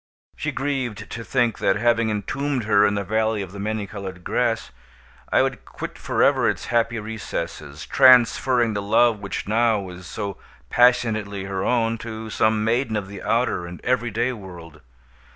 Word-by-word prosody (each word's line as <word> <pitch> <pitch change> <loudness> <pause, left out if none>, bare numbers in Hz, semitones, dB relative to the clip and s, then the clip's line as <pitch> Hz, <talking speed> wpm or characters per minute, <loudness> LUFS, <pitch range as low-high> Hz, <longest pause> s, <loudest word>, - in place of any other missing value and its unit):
She - - -3
grieved 135 -6 -3
to 115 - -5
think 120 -2 0
that, - - +2
having 115 +1 +2
entombed 130 +5 -2
her 105 -1 +4
in 105 - 0
the 100 - -1
Valley 110 +1 0
of 95 - -9
the 100 - -9
Many 105 0 -2
Colored 95 -3 -8
Grass, 115 - -1 0.6
I - - +4
would - - -3
quit - - -8
forever - - +2
its - - -3
happy 115 0 +2
recesses, 85 -8 -6
transferring 125 -1 +5
the 100 - -2
love 110 +2 +3
which 100 -1 -5
now 110 0 +2
was 90 -2 -9
so 100 0 -5 0.3
passionately 110 -5 +2
her 95 -1 -3
own 115 -1 +1
to 110 -1 -7
some 110 0 +2
maiden 115 +1 0
of 100 -2 -3
the 100 -1 -8
outer 85 - 0
and 90 0 -9
everyday 120 0 0
world. 90 -7 -11
110 Hz, 165 wpm, -23 LUFS, 100-120 Hz, 0.6 s, transferring